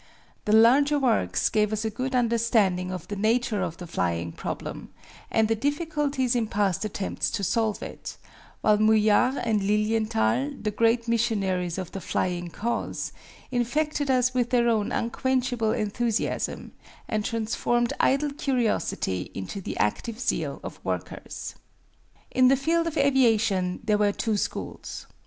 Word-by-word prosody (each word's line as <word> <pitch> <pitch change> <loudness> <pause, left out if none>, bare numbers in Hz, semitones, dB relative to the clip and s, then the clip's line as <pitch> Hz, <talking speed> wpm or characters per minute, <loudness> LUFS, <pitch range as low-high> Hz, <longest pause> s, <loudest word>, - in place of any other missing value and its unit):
The 210 - 0
larger 260 +7 +5
works 225 - +1
gave 210 -1 +1
us 215 +1 -2
a 220 - -1
good 255 +4 -3
understanding 225 -6 +2
of 180 -2 -6
the 205 - -4
nature 220 0 +1
of 170 -2 -3
the 180 - -7
flying 85 - -2
problem, - - -6 0.4
and 220 -1 +2
the 225 - +2
difficulties 285 0 0
in 230 -2 +1
past 200 -4 0
attempts 205 -2 -2
to 200 - -3
solve 220 +2 0
it, - - -8 0.4
while 210 -1 +4
Mouillard 215 +4 +4
and 215 -2 +1
Lilienthal, 210 - +1
the 210 - -2
great 230 +2 +2
missionaries 195 -7 0
of 185 -3 -5
the 195 - -6
flying 175 -1 -2
cause, 235 +7 -3 0.4
infected 285 +4 0
us 255 -1 +3
with 245 -2 +1
their 240 -1 +3
own 215 -3 +1
unquenchable 245 -1 0
enthusiasm, 220 +1 -1 0.4
and 215 -2 -1
transformed 230 +1 0
idle 280 +2 +2
curiosity 235 - -1
into 95 - -5
the - - -5
active 220 - -1
zeal - - -1
of - - -8
workers. - - -5 0.8
In 255 0 +5
the 270 +1 +5
field 330 +4 +1
of 325 -1 -3
aviation 225 -9 +2
there 210 -2 +2
were 205 -1 +3
two 220 +1 -1
schools. - - -5
225 Hz, 145 wpm, -26 LUFS, 205-250 Hz, 0.8 s, larger